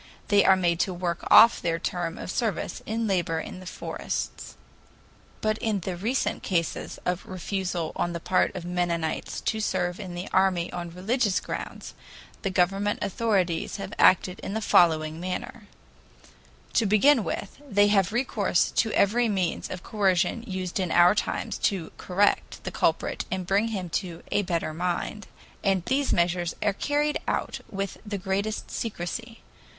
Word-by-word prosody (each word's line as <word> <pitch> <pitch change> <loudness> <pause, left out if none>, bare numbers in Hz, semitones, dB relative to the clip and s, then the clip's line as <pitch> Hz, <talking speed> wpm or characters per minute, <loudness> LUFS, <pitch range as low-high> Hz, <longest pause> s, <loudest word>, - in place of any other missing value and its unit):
They 205 -1 +5
are 190 - +6
made 175 -2 +1
to 185 0 0
work 175 -1 -2
off 230 - +8
their 165 -1 0
term 170 0 -3
of - - -5
service 220 -5 -2
in 225 +1 -1
labor 175 -5 0
in 185 - -7
the 185 - -10
forests. - - -5 0.9
But 215 0 0
in 215 -4 -1
the 180 +1 -3
recent 225 +9 -1
cases 170 -4 -2
of 180 0 -1
refusal 185 -2 -3
on 175 - -1
the 170 - -4
part 185 +3 +1
of 180 -2 -5
Mennonites 175 -2 -2
to 220 - -1
serve 180 -3 -1
in 185 -4 -6
the 175 +2 -5
army 185 -2 +2
on 175 -1 -4
religious 200 +4 0
grounds, - - -6 0.5
the 195 - -1
government 195 +3 +1
authorities 195 -6 0
have 195 -1 -6
acted 185 0 +5
in 200 - -5
the - - +1
following 160 -6 +3
manner: 185 +4 -5 1.1
To 225 - +3
begin 225 +5 +5
with, 200 +8 -5
they 205 0 +4
have 195 -4 +3
recourse 245 +4 +1
to 225 - +3
every 230 +4 +3
means 185 -4 -1
of 185 -1 -6
coercion 200 0 +1
used 185 -2 -3
in 185 -2 0
our 175 +3 +6
times 210 - -2
to 185 -5 -5
"correct" 200 +3 +1
the - - -4
culprit - - 0
and 185 -1 -2
bring 200 +5 +2
him 195 -5 -3
to 175 -3 -9
"a 205 - +3
better 170 -4 -2
mind," 180 +5 -3 0.4
and 190 -3 +1
these 275 +2 +1
measures 175 0 +1
are 205 -1 +2
carried 290 +7 0
out - - -1
with 195 0 -4
the 205 -2 -4
greatest 200 +3 -2
secrecy. 225 +2 -5
190 Hz, 160 wpm, -26 LUFS, 175-210 Hz, 1.1 s, off